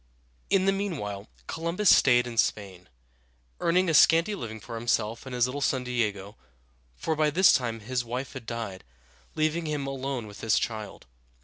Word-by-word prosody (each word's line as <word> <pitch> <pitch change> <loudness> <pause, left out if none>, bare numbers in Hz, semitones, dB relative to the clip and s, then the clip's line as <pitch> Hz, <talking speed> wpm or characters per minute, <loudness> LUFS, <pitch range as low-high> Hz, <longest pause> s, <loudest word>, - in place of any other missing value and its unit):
In 190 -1 +3
the 195 - +4
meanwhile 140 - -4 0.2
Columbus 170 +4 +3
staid 120 -2 +4
in 120 -2 -3
Spain, 95 -4 -1 0.7
earning 180 +2 +2
a 165 - +1
scanty 165 +6 +5
living 110 - -6
for 120 - -10
himself 115 +1 -1
and 130 - -5
his 120 -1 +3
little 135 +3 -4
son 130 -2 +1
Diego 105 -5 -2
(de - - -23
ā´go); - - -33 0.6
for 160 - -2
by 155 0 +2
this 180 +5 +5
time 115 -4 -1
his 125 +3 -2
wife 125 +4 -5
had 125 -4 -9
died, 115 -5 -5 0.5
leaving 155 +1 0
him 150 -2 -2
alone 135 -3 -4
with 105 -1 -11
this 110 -1 +2
child. 110 -4 -4
125 Hz, 180 wpm, -27 LUFS, 110-155 Hz, 0.7 s, scanty